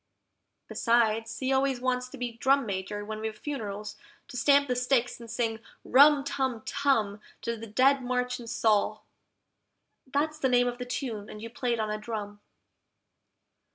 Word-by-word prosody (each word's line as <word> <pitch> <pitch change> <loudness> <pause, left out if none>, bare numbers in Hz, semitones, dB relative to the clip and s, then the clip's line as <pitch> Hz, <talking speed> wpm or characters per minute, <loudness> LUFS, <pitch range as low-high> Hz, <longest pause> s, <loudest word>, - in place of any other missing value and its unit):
Besides, 230 -1 +1
he 265 0 0
always 265 -1 +1
wants 250 0 -1
to 275 - -10
be 245 -1 -3
Drum 265 +3 +2
Major 205 +1 -4
when 215 0 -5
we've 220 -1 -4
funerals, 210 -7 -5 0.3
to 270 - -10
stamp 280 +3 +4
the 250 - 0
stick 245 -1 +2
and 235 -1 -10
sing 225 -1 -1 0.2
RUM 285 +2 +6
TUM 260 -5 -2
TUM 225 -8 +1 0.2
To 235 - -1
the 225 0 -8
Dead 265 +5 +3
March 250 0 -1
in 235 - -9
Saul 215 -1 +1 1.0
(that's 300 +3 -1
the 265 - +2
name 245 0 +4
of 245 0 -3
the 250 - -4
tune, 235 -5 -4
and 210 - -9
you 230 +1 -8
play 245 0 -1
it 230 - -2
on 215 -1 -1
a 215 - -3
drum). 210 -2 -6
240 Hz, 170 wpm, -28 LUFS, 215-265 Hz, 1.0 s, RUM